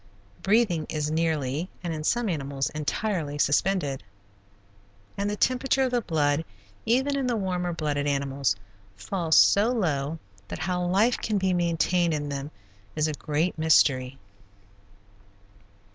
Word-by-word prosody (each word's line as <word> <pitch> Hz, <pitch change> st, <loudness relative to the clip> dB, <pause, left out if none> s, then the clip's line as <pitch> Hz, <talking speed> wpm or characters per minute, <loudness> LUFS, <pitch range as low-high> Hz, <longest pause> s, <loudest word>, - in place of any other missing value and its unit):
Breathing 195 Hz, -7 st, +2 dB
is 150 Hz, -1 st, -2 dB
nearly, 160 Hz, 0 st, -1 dB
and 170 Hz, -2 st, -2 dB
in 155 Hz, -1 st, -5 dB
some 235 Hz, +7 st, +1 dB
animals, 140 Hz, -6 st, -2 dB
entirely 155 Hz, 0 st, -2 dB
suspended, 145 Hz, -1 st, +1 dB, 1.1 s
and 200 Hz, +1 st, -1 dB
the 210 Hz, -, -2 dB
temperature 260 Hz, +4 st, +1 dB
of 255 Hz, -, 0 dB
the 245 Hz, -1 st, +1 dB
blood 150 Hz, -4 st, +1 dB, 0.4 s
even 265 Hz, +5 st, +2 dB
in 270 Hz, -2 st, -1 dB
the 245 Hz, -, +1 dB
warmer 180 Hz, -4 st, -1 dB
blooded 150 Hz, -3 st, -2 dB
animals, 140 Hz, -5 st, 0 dB, 0.4 s
falls 160 Hz, -, 0 dB
so 205 Hz, +3 st, +5 dB
low 160 Hz, -, -1 dB, 0.3 s
that -, -, -6 dB
how 180 Hz, +2 st, -2 dB
life 200 Hz, +7 st, +2 dB
can 215 Hz, -2 st, -1 dB
be 190 Hz, -1 st, +1 dB
maintained 170 Hz, -1 st, +1 dB
in 145 Hz, -1 st, -3 dB
them 140 Hz, 0 st, -4 dB, 0.5 s
is 155 Hz, 0 st, +1 dB
a 155 Hz, -, -2 dB
great 155 Hz, +3 st, -2 dB
mystery. 135 Hz, -4 st, +3 dB
165 Hz, 135 wpm, -26 LUFS, 145-195 Hz, 1.1 s, so